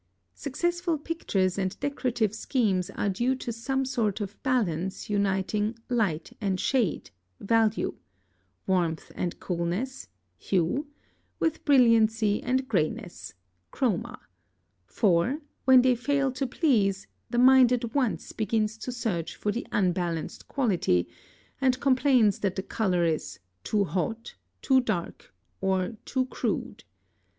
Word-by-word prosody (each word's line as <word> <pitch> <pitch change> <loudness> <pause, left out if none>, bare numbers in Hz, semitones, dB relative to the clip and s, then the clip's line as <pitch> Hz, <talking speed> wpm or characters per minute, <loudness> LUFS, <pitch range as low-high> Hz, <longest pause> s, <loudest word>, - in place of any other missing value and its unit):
Successful 345 +4 -1
pictures 200 - -1
and 190 -1 -2
decorative 250 -7 -1
schemes 205 -6 0
are - - -1
due 240 +7 +1
to 250 -2 -5
some 265 +4 -2
sort 230 -6 -1
of 205 -1 -6
balance 195 -7 -1
uniting 205 +2 0
"light 200 -10 -1
and 190 -2 0
shade" 235 - 0 0.3
(value), 225 0 +1 0.7
"warmth 175 -4 0
and 175 -2 -3
coolness" 180 +10 -3 0.3
(hue), 195 - 0 0.5
with 320 -1 0
"brilliancy 225 -6 +4
and 260 +2 0
grayness" 175 - -2 0.4
(chroma); 235 0 -1 0.7
for, 200 - +2 0.3
when 260 -1 +7
they 255 -1 +5
fail 275 +2 0
to 260 +1 -2
please, 210 - +1 0.2
the 240 - -2
mind 255 0 +7
at 235 -2 -1
once 260 -6 -1
begins 220 0 -1
to 250 - -5
search 200 -9 -3
for 210 - -1
the 235 - -4
unbalanced 175 -4 -1
quality, 185 - +1 0.5
and 255 -1 +2
complains 255 -6 +3
that 190 -2 -1
the 190 - -3
color 185 -5 0
is 160 -9 -2 0.3
"too 210 -2 +1
hot," 195 +6 -3 0.3
"too 265 - +5
dark," 205 - -4 0.3
or 190 +2 0
"too 260 -1 0
crude." 255 - -3
220 Hz, 125 wpm, -27 LUFS, 190-255 Hz, 0.7 s, when